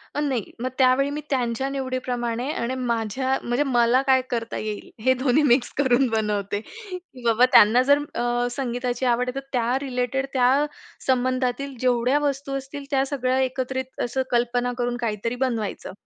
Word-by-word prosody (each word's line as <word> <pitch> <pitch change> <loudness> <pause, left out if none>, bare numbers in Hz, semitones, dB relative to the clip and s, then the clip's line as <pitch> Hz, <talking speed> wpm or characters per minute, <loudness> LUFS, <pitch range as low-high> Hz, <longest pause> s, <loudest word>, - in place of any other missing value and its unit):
अ, - - 0
नाही. 265 -8 -2
मग 255 - -1
त्यावेळी 265 +1 +4
मी 295 +1 -4
त्यांच्या 250 -1 0
निवडीप्रमाणे 255 -2 -2
आणि 250 -2 -2
माझ्या 250 +1 -1
म्हणजे 240 +4 +1
मला 245 -2 +3
काय 260 -1 +5
करता 230 -1 -3
येईल? 215 -1 -5
हे 260 +1 +5
दोन्ही 275 +3 +3
मिक्स 245 -2 +3
करून 260 -1 +3
बनवते. 210 -2 -1
की 365 - -11
बाबा 230 +1 +5
त्यांना 235 0 +7
जर 285 +2 +5 0.2
अ, 240 0 0
संगीताची 245 0 -2
आवड 250 0 +2
आहे, 250 - -6
तर 275 - -13
त्या 245 +1 +1
रिलेटेड, 260 0 -1
त्या 265 +3 +3 0.4
संबंधातील 255 +1 0
जेवढ्या 250 +2 +2
वस्तू 280 -1 -2
असतील 275 +1 -7
त्या 270 -1 +2
सगळ्या 260 -2 0
एकत्रित 260 0 -2
असं 245 +2 -1
कल्पना 245 0 +1
करून 245 -1 -1
काहीतरी 230 0 -2
बनवायचं. 225 -5 -3
255 Hz, 160 wpm, -24 LUFS, 240-270 Hz, 0.4 s, त्यांना